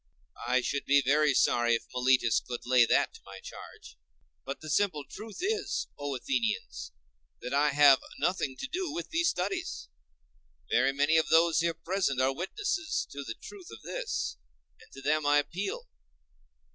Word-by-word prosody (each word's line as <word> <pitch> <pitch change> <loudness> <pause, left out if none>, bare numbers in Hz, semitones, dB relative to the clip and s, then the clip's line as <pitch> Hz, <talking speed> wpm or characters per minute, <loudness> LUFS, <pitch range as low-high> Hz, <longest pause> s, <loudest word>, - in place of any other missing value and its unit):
I 125 +1 +3
should 140 +3 -2
be 140 0 +4
very 145 +1 +3
sorry 120 -1 +3
if - - -3
Meletus 125 -2 +3
could 120 -1 -7
lay 125 -2 +5
that - - +2
to - - -15
my - - -11
charge. 65 - -12 0.4
But 135 +1 -6
the 155 - -9
simple 160 -4 +1
truth 215 -1 -9
is, 425 +3 -1
O 145 -1 -4
Athenians, 125 -3 -2 0.5
that 125 - -5
I 145 +1 +3
have 140 -1 +6 0.2
nothing 175 -7 -1
to - - -3
do 355 +3 -3
with 345 - -5
these 335 +1 +2
studies. 180 - -3 0.8
Very 130 +2 +3
many 145 +4 +2
of 160 - +2
those 165 0 +4
here 170 0 0
present 165 -5 -1
are 130 +1 +2
witnesses 320 - -2
to 140 0 -6
the 115 -4 -6
truth 390 -4 -11
of - - -12
this, - - -3 0.4
and 255 - -19
to 135 - -10
them 155 +2 +1
I 145 0 +4
appeal. 180 +7 -3
145 Hz, 170 wpm, -29 LUFS, 130-190 Hz, 0.8 s, have